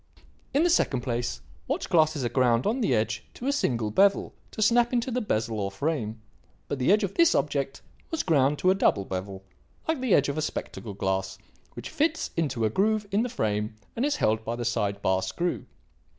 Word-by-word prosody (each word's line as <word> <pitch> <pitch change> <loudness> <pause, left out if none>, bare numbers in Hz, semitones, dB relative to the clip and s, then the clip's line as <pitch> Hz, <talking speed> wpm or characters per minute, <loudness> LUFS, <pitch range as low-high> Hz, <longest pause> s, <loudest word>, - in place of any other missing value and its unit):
In 290 - +3
the 350 - +3
second 130 - +2
place, 120 -1 -3 0.3
watch - - -2
glasses 155 -5 +2
are - - 0
ground 120 0 +2
on 240 +5 0
the 135 - +2
edge 110 0 -1
to 245 - -8
a 280 - +2
single 120 - 0
bevel 200 - +3 0.2
to - - -11
snap 235 +3 +3
into 245 +1 0
the 250 +1 0
bezel 110 - -1
or 100 -1 -1
frame; 115 -1 -2 0.5
but 140 - -3
the 130 +8 +3
edge 210 +1 +4
of 195 -1 -2
this 335 0 +4
object 140 -2 -1 0.3
was 325 - -1
ground 145 -3 +3
to 185 - +3
a - - +5
double 100 - +2
bevel, 95 +1 -5 0.4
like 320 -4 0
the 250 -7 +3
edge 140 - +3
of 140 +2 -2
a - - 0
spectacle 115 -8 -5
glass, 95 0 -2 0.4
which - - -8
fits 320 +1 0
into 135 -9 0
a - - +2
groove 215 - +1
in 205 +2 +2
the 245 - -1
frame 105 - -2 0.2
and 235 - -1
is 290 +1 +1
held 110 - +1
by 115 +1 -3
the 120 0 -4
side 100 -3 -1
bar 95 0 +2
screw. 170 - -2
140 Hz, 210 wpm, -27 LUFS, -, 0.5 s, a